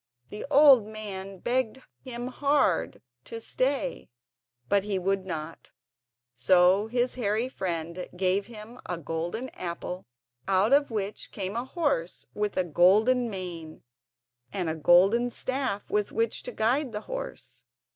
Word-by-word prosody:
The 210 - -6
old 280 -7 +7
man 195 -3 -6
begged 250 +4 -1 0.2
him 245 -2 -5
hard 280 - +1 0.2
to 230 - -6
stay, 270 +4 -1 0.6
but 200 +4 +3
he 205 -1 -1
would 190 +1 -1
not, 165 -2 -6 0.7
so 180 - +4
his 245 +2 0
hairy 225 0 0
friend 170 -5 -4
gave 190 +2 +1
him 230 +1 -10
a 175 - -2
golden 170 - -4
apple 180 +1 -6 0.4
out 195 +5 +3
of 285 0 +4
which 210 -2 -3
came 195 +1 -3
a 240 +2 -2
horse 270 - -2
with 210 -1 -2
a 185 - +3
golden 210 - +4
mane, 175 -5 -6 0.7
and 180 -5 -1
a - - -3
golden 190 +10 +4
staff 255 -4 -3
with 210 -1 0
which 225 0 0
to 245 - -6
guide 245 +4 0
the 210 - -3
horse. - - -7
210 Hz, 135 wpm, -27 LUFS, 185-245 Hz, 0.7 s, old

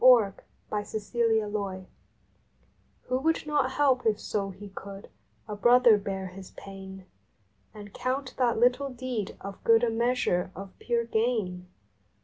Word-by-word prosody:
June 235 -6 +7 0.3
Fourteenth 210 0 -4
FORTUNE 225 -3 +2
VI/HO 200 +5 -8
would 325 +3 +1
not 295 -3 +1
help 265 -3 +3
if 215 -1 +2
so 200 -2 -2
he 195 +2 -10
could 195 0 -9 0.4
a 210 - -4
brother 240 +1 +6
bear 195 -1 -4
his 190 +1 -10
pain 190 -1 -9 0.7
And 205 -2 -11
count 260 +1 -2
that 245 -2 +3
little 250 +4 +3
deed 250 -5 -4
of 195 0 -8
good 230 0 +5
a 235 - +2
measure 235 -6 +1
of 195 0 -8
pure 235 -1 0
gain? 220 -6 -1
220 Hz, 135 wpm, -28 LUFS, 195-250 Hz, 0.7 s, June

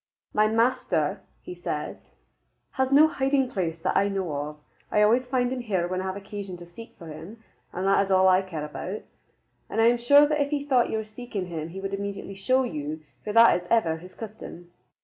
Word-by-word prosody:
"My 215 0 +4
master," 215 - +1 0.2
he - - -7
said, 165 -4 -4 0.7
"has 265 0 0
no 295 +3 +7
hiding 270 -3 0
place 170 -6 -2
that 185 - 0
I 200 - +3
know 190 -5 -2
of. 145 +1 -4 0.3
I 210 - +4
always 240 +4 +3
find 250 -1 0
him 260 - -3
here 195 -7 -1
when 185 +1 -2
I - - -5
have 190 0 -3
occasion 200 -2 -7
to 175 - -11
seek 225 +7 -13
for 165 - -10
him, 195 +9 -10 0.3
and 185 - -3
that 195 0 +4
is 195 - -6
all 190 0 +5
I 185 0 +5
care 165 -6 -5
about. 180 +7 -6 0.7
But - - -2
I 225 - +5
am 240 +1 +4
sure 285 +5 +7
that 300 0 0
if 285 - 0
he 285 -1 -2
thought 255 -4 +3
you - - -1
were 220 - -2
seeking 215 -2 -6
him 165 -2 -5
he 190 +3 -7
would 195 0 -5
immediately 200 0 -4
show 255 +7 +1
you, 155 - -4 0.2
for 210 - -3
that 230 +1 +7
is 175 - -14
ever 165 -9 +2
his 180 +3 -13
custom." 200 -5 -9
200 Hz, 220 wpm, -26 LUFS, 175-240 Hz, 0.7 s, no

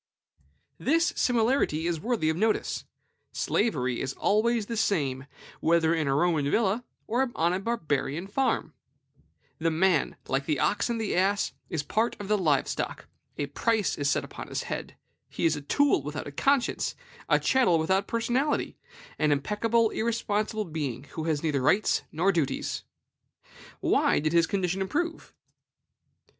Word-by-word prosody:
This 330 +4 +2
similarity 230 - +2
is 170 -2 0
worthy 220 -5 0
of - - -3
notice. 215 +5 0 0.5
Slavery 130 - 0
is 135 0 -2
always 220 +1 +1
the 230 - -4
same, 140 -11 0 0.3
whether 165 0 +3
in 160 -3 0
a 135 - +2
Roman 155 -3 +2
villa 220 +5 +1 0.2
or 250 +3 +1
on 170 +2 +2
a 185 - 0
Barbarian 165 - -2
farm. 200 - 0 0.9
The 165 +1 +2
man, 165 -1 +2
like 135 +1 -1
the 150 -4 0
ox 210 - +1
and 235 -1 -1
the 220 -3 -1
ass, 195 +3 +1 0.2
is 160 -5 -2
a - - -24
part 225 +2 0
of 205 -1 -7
the 210 - +3
live 150 -7 +2
stock; - - -4 0.3
a 145 - -1
price 215 +8 0
is 145 -1 0
set - - +1
upon - - -9
his - - -3
head; - - -5 0.3
he - - -2
is 160 -1 +3
a 145 - -5
tool 285 - +2
without 150 +1 -5
a 145 - -7
conscience, 270 - +1 0.3
a - - +5
chattel 245 -11 +3
without 190 +5 +1
personality, 245 +5 0 0.4
an 150 -1 +3
impeccable, 215 +9 +1
irresponsible 215 -1 -1
being, 145 -6 -4
who 160 - -4
has 155 -2 0
neither 150 -4 +1
rights 195 +11 +3
nor 180 +5 +2
duties. 165 -7 -2 1.0
Why - - +3
did 155 +2 0
his 170 0 +4
condition 190 -1 -1
improve? 330 - -3
185 Hz, 155 wpm, -27 LUFS, 155-225 Hz, 1.0 s, a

